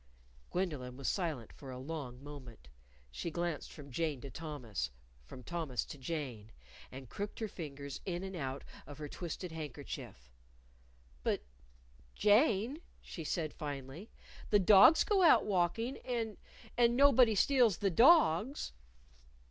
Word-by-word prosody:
_" - - -29
Gwendolyn 145 -9 -3
was 135 - -4
silent 155 - -2
for 135 - -11
a 130 - -6
long 135 -2 -6
moment. 130 - -11 0.4
She - - -4
glanced 170 -1 -3
from 140 -3 -11
Jane 155 0 -1
to 140 - -8
Thomas, 140 - -4 0.4
from 125 - -11
Thomas 160 -7 -3
to 145 - -10
Jane, 130 -7 -5 0.4
and 130 0 -9
crooked 205 - -5
her 220 - -2
fingers 140 -7 -7
in 180 -1 -3
and 190 0 -5
out 135 -4 -4 0.2
of 145 - -9
her 150 -1 -6
twisted 175 +3 -6
handkerchief. 140 - -7 0.9
"But, - - -1 0.7
Jane," 225 +4 +3 0.2
she 165 - -8
said 155 -1 -2
finally, 145 - -7 0.4
"the 210 - +5
dogs 205 - +7
go 405 -2 +2
out 340 - +6
walking 210 +6 0
and 230 -4 -3 0.4
and 240 0 +3
nobody 255 -5 +6
steals 240 -3 +4
the 195 -2 +1
dogs." 250 - +4
165 Hz, 140 wpm, -34 LUFS, 135-205 Hz, 0.9 s, dogs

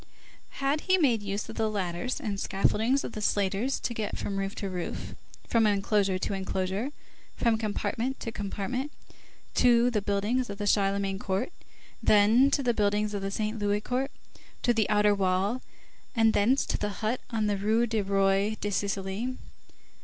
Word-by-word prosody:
Had 280 +2 +1
he 375 - +6
made 250 - +3
use 200 0 -3
of - - -9
the 220 -1 +1
ladders 195 +3 -2
and 200 -3 -3
scaffoldings 225 +8 +1
of - - -5
the 215 - -6
slaters 205 +6 0
to 235 - -2
get 220 -3 -3
from 195 -1 -3
roof 195 0 -3
to 200 - -4
roof, 180 -2 -5 0.3
from 225 -2 +3
enclosure 200 -1 +2
to 185 - -2
enclosure, 190 +5 -2 0.5
from 230 -2 +3
compartment 220 +4 -2
to 230 - -4
compartment, 220 +7 -3 0.6
to 245 0 +4
the 215 -3 0
buildings 210 +5 0
of 200 - -5
the 205 - -3
Charlemagne 195 -1 +1
court, 200 - -2 0.5
then 220 +6 +5
to 280 - +1
the 240 -1 +2
buildings 210 0 +1
of 200 - -2
the 195 - -2
Saint 215 +2 -2
Louis 205 0 +1
court, 255 +4 -1 0.5
to 240 - +4
the 220 -4 +1
outer 210 0 +4
wall, 195 +5 +1 0.5
and 225 -1 +4
thence 245 +7 +3
to - - -2
the 205 +1 -4
hut 235 +4 0
on 220 -2 0
the 205 -1 +1
Rue 220 +4 +2
du 225 -2 0
Roi 195 +2 +2
de 205 - -2
Sicile? 200 +5 -2
210 Hz, 175 wpm, -28 LUFS, 200-235 Hz, 0.6 s, he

